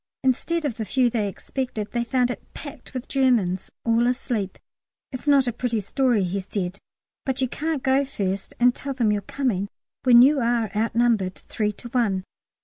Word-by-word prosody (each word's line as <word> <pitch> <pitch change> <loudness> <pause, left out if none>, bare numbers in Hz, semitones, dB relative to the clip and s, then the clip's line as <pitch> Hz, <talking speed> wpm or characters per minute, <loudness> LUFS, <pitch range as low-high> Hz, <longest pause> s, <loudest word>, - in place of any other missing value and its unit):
Instead 305 +6 +1
of 250 -6 -2
the 225 - -2
few 245 +4 +2
they 220 -4 0
expected 215 0 -4
they 240 -1 0
found 250 +1 +1
it - - -6
packed 285 -4 -9
with 255 0 -4
Germans, 235 -10 +2 0.2
all 230 +1 +3
asleep. 240 -6 -1 0.5
"It's 255 +2 -7
not 280 -2 +5
a 240 - -1
pretty 235 -1 -1
story," 235 +1 +1
he 185 +2 -1
said, 190 0 -4 0.4
"but 265 -2 -2
you 260 - +2
can't 305 +2 -2
go 270 +1 +3
first 200 -8 -3
and 245 0 +5
tell 275 +1 -5
them 230 -5 +2
you're 205 -1 0
coming 205 -4 -1 0.4
when 245 -2 +8
you 280 +2 +5
are 235 -3 +1
outnumbered 225 -3 +2
three 210 -2 -2
to 225 - -10
one." 215 -7 +1
240 Hz, 180 wpm, -24 LUFS, 210-265 Hz, 0.5 s, when